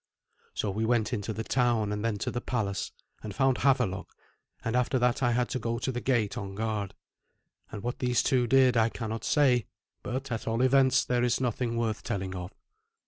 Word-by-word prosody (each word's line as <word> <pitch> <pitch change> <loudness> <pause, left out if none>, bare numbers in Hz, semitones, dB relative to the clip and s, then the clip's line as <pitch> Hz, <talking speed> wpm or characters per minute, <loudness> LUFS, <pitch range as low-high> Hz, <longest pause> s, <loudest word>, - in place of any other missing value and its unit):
So 105 - -1
we 110 +3 -2
went 115 0 +1
into 105 -1 -2
the 110 +1 -4
town, 120 -4 +1
and 105 0 -3
then 115 -2 0
to - - -1
the 120 - -3
palace, 100 -7 -2 0.3
and 105 -2 -7
found 135 -1 +2
Havelok, 125 -8 +1 0.6
and 115 - -1
after 125 +1 +2
that 125 0 +1
I 120 -2 +3
had 125 0 +1
to 130 - -2
go 115 0 -2
to 130 - -2
the 125 -1 -4
gate 120 -6 0
on 100 -1 -6
guard. 105 -2 -2 0.8
And 105 -1 -7
what 120 +1 -3
these 125 -1 +2
two 125 -3 +2
did 130 0 +5
I 115 0 +4
cannot 115 -1 -5
say, 125 -7 +3 0.3
but, 130 +2 -4
at 115 - -3
all 115 +2 +1
events, 130 0 +4
there 125 -1 +1
is 120 -2 +2
nothing 120 -1 -1
worth 110 -2 -1
telling 95 -4 -3
of. 90 0 -6
120 Hz, 200 wpm, -29 LUFS, 110-125 Hz, 0.8 s, did